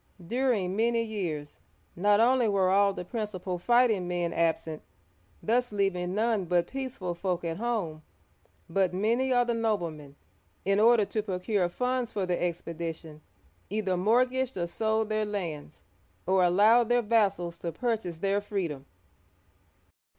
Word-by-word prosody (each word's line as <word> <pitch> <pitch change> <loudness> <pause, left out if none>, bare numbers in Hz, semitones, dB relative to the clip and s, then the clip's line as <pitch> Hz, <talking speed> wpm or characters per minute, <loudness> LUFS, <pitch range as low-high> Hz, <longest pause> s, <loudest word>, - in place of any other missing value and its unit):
During 225 -4 0
many 230 +1 +2
years 175 -10 -4 0.4
not 205 +3 +3
only 245 +1 +4
were 195 -3 +2
all 200 +1 +4
the 180 -2 -6
principal 190 -4 -4
fighting 230 -3 +3
men 175 -1 -1
absent, 165 -1 -1 0.3
— - - -35
thus 245 +2 +1
leaving 190 -3 -1
none 220 -3 +1
but 175 0 +2
peaceful 255 -10 -4
folk 175 0 -2
at 165 -1 -3
home, 205 -9 -2 0.3
— - - -41 0.3
but 180 +1 +1
many 235 +7 +1
of 245 -1 +3
the 240 - 0
noblemen, 170 -11 -2 0.5
in 195 +1 +2
order 225 -1 +5
to 215 - -2
procure 190 -1 -1
funds 250 +4 -1
for 195 -2 -1
the 180 -1 0
expedi 170 -1 -3
tion, 155 -2 -13 0.5
either 200 -2 -1
mortgaged 250 +6 +1
or 175 - 0
sold 220 +4 -1
their 215 0 0
lands, 175 - -5 0.4
or 190 0 +3
allowed 215 +6 +5
their 245 0 +3
vassals 200 -6 +1
to 170 - -4
purchase 210 -3 -2
their 195 +3 0
freedom. 170 -10 -4
200 Hz, 150 wpm, -28 LUFS, 175-230 Hz, 0.5 s, order